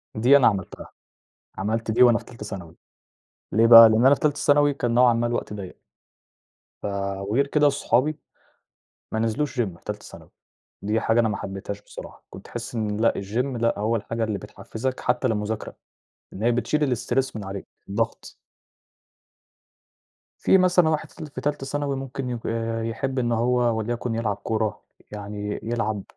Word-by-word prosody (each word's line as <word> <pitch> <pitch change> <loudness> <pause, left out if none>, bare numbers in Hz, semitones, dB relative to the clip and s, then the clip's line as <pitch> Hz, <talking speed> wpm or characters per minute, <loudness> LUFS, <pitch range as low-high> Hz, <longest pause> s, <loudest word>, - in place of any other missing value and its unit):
دي 125 +6 +6
أنا 135 - +5
عملتها، 95 -4 -3 0.7
عملت 110 +3 -1
دي 120 +3 +5
وأنا 120 -1 +6
في - - -9
تالتة 115 -3 -10
ثانوي. 90 -5 -8 0.8
ليه 115 +4 +4
بقى، 115 -1 +11
لأن 110 +3 +3
أنا 140 - +7
في - - -13
تالتة 150 -1 +1
ثانوي 145 0 +4
كان 120 -4 -1
نوعًا 125 0 +5
ما 115 +1 0
الوقت 120 -3 -3
ضيّق. 100 -3 -8 1.1
ف - - -4 0.4
وغير 115 +8 0
كده 145 0 +3
صحابي، 140 +2 +1 1.0
ما 110 - -1
نزلوش 115 +5 -1
gym - - +3
في - - -29
تالتة - - -5
ثانوي، - - -13 0.5
دي 105 +2 0
حاجة 115 +1 +2
أنا 115 - +2
ما 105 - -2
حبيتهاش 100 +1 -6
بصراحة، - - -11
كنت - - -11
تحس 120 +2 -7
إن 105 -2 -2
لأ، 115 - +4
الgym 120 +7 -2
لأ، 115 -3 +1
هو 110 +3 +1
الحاجة 115 +1 -3
اللي 105 -2 -2
بتحفزك 110 +8 -5
حتى 125 +1 0
للمذاكرة، 110 -1 -3 0.6
إن 95 - -7
هي 120 +2 +3
بتشيل 130 +2 0
الstress 130 +2 -1
من 105 - -5
عليك، 95 0 -6 0.2
الضغط. 110 +3 -3 2.1
في - - +5
مثلًا 180 -3 +4
واحد 155 -1 -2
في - - -19
ال 155 - -5
في 145 - -8
تالتة 145 -2 -2
ثانوي 140 0 -2
ممكن 135 -1 -5
يك 120 -2 -5 0.4
يحب 130 +4 -2
إن 120 -1 0
هو 120 0 +2
وليكن 120 +1 -2
يلعب 110 -3 -1
كورة، 110 +1 -2 0.3
يعني 105 0 -5
يلعب 110 -3 -2
115 Hz, 170 wpm, -24 LUFS, 105-130 Hz, 2.1 s, بقى